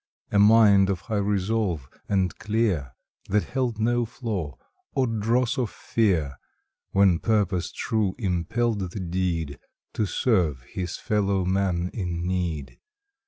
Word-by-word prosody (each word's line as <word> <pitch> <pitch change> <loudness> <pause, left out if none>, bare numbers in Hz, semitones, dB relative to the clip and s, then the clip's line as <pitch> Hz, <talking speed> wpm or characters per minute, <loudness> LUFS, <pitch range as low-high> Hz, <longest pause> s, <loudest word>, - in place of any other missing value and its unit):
A 100 - +3
mind 105 -2 +6
of 95 -3 -1
high 110 -2 -3
resolve, 100 -6 0 0.2
and 95 -2 +1
clear, 105 - 0 0.4
That 105 +1 +2
held 125 -4 -2
no 120 +2 +2
flaw, 105 - -4 0.4
or 130 - +3
dross 115 +2 0
of 120 -4 0
fear, 85 - 0 0.5
When 95 -4 +4
purpose 100 -5 0
true 105 -4 -1
impelled 105 +3 0
the 95 - -6
deed 85 -5 -2 0.3
To 105 - 0
serve 85 - +1
his 90 +5 -5
fellow 100 -3 0
man 90 -2 0
in 90 -4 -3
need. 85 -6 -3
100 Hz, 125 wpm, -25 LUFS, 90-110 Hz, 0.5 s, mind